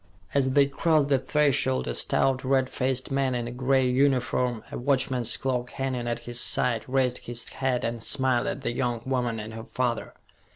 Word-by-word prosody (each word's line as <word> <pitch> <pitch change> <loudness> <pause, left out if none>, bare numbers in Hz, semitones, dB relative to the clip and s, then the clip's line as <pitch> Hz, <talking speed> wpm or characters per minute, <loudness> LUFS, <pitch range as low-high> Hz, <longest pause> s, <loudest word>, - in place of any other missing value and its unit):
As 130 -2 +1
they 140 0 +5
crossed 145 +1 +1
the 135 -2 +3
threshold 130 - +1
a - - -1
stout, 130 - +1
red 130 0 +1
faced 130 0 -1
man 135 -2 +1
in 120 -1 -2
a - - -5
gray 130 +1 +1
uniform, 125 -2 +1
a - - -4
watchman's 130 -2 +1
clock 125 -2 -2
hanging 130 -3 -3
at 120 - -1
his 120 0 +2
side, 120 -2 +1
raised 130 -1 +1
his 120 0 -4
hat 130 -2 -1
and 115 0 -3
smiled 130 -3 +1
at - - -3
the - - -2
young 120 -2 -2
woman 125 -4 -1
and 110 +1 -7
her 110 +1 -8
father. 120 -3 -2
130 Hz, 190 wpm, -26 LUFS, 120-135 Hz, -, they